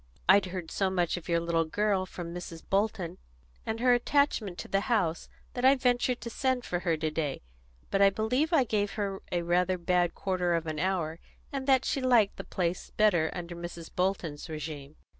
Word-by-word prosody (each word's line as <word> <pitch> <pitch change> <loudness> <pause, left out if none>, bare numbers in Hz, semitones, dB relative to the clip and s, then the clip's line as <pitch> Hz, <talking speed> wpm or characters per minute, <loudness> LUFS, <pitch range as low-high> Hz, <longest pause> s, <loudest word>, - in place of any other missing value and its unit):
"I'd 190 0 +6
heard 180 -3 -6
so 195 -1 +1
much 175 -3 0
of 175 0 -8
your 170 0 +3
little 165 -1 +1
girl 195 +2 0
from 170 -2 -7
Mrs. 170 -2 -7
Bolton, 195 -3 -1 0.5
and 220 +1 -2
her 250 +1 +5
attachment 245 -7 +1
to - - -6
the 195 - +1
house, 175 -8 0 0.2
that 245 - -4
I 265 +1 +7
ventured 250 -1 +1
to 235 - -5
send 260 0 0
for 175 - -1
her 170 -3 0
to 155 0 -1
day. 150 - -3 0.5
But 195 - +2
I 200 - +8
believe 250 - 0
I 310 -6 +5
gave 205 -3 -1
her 200 -2 -3
rather 175 +1 +1
a - - -6
bad 175 0 +1
quarter 180 -3 0
of 165 -1 -1
an 155 -1 -3
hour, 170 -2 -1 0.3
and 270 -1 -3
that 265 -1 +4
she 275 - 0
liked 240 -6 +3
the - - -5
place 180 -1 -2
better 180 -7 +3
under 175 -1 -6
Mrs. 170 -1 -8
Bolton's 180 -5 -1
régime." 150 -2 -6
185 Hz, 195 wpm, -29 LUFS, 170-220 Hz, 0.5 s, I